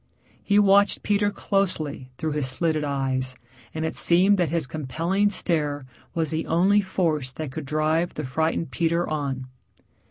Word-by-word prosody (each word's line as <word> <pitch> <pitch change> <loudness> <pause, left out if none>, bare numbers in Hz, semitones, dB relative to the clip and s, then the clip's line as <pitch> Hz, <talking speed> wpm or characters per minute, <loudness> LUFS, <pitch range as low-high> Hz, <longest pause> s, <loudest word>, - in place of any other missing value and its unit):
He 205 - +2
watched 200 0 +4
Peter 205 0 +2
closely 180 -10 -1
through 160 -1 -2
his 145 -3 -1
slitted 155 +3 0
eyes, 130 -2 -1 0.4
and 160 0 -3
it 160 - -2
seemed 190 +3 +3
that 175 -4 +2
his 165 -1 0
compelling 165 +9 0
stare 150 -8 -1 0.3
was 160 -3 0
the 160 0 -2
only 190 +5 +4
force 160 -8 -1
that 155 -2 -5
could 150 +2 -6
drive 155 +3 0
the 150 - -3
frightened 160 +5 -1
Peter 170 0 0
on. 140 -4 -3
160 Hz, 155 wpm, -25 LUFS, 145-180 Hz, 0.4 s, watched